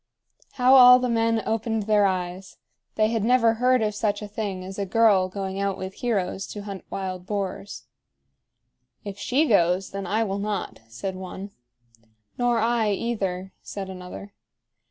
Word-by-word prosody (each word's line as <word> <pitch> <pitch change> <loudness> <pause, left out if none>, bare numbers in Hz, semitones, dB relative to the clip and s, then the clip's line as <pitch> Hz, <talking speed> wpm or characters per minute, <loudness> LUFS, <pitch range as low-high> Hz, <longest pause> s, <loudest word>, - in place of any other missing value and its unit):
How 255 0 +4
all 250 -1 +10
the 250 0 -1
men 230 -1 +1
opened 225 0 -1
their 205 -1 +3
eyes! 185 0 -4 0.4
They 215 0 +2
had 225 -2 -1
never 230 -1 +4
heard 250 +1 +2
of 210 -1 0
such 205 0 -1
a - - -5
thing 200 -3 -4
as 190 +2 -8
a 200 - -1
girl 200 -3 +4
going 195 0 -4
out 200 -1 -1
with 190 0 -6
heroes 195 -5 -2
to 205 - -7
hunt 200 -2 -7
wild 185 -1 -5
boars. 200 -1 -4 1.2
"If 200 0 -7
she 275 +9 +2
goes, 185 -3 +2
then 195 -1 -5
I 215 +4 +1
will 200 -2 -3
not," 205 -2 -3
said 115 +13 -5
one. 190 +2 -8 0.8
"Nor 245 -1 +1
I, 230 -1 +1
either," 195 -4 -2
said 195 -1 -6
another. 185 +2 -9
205 Hz, 160 wpm, -25 LUFS, 190-225 Hz, 1.2 s, all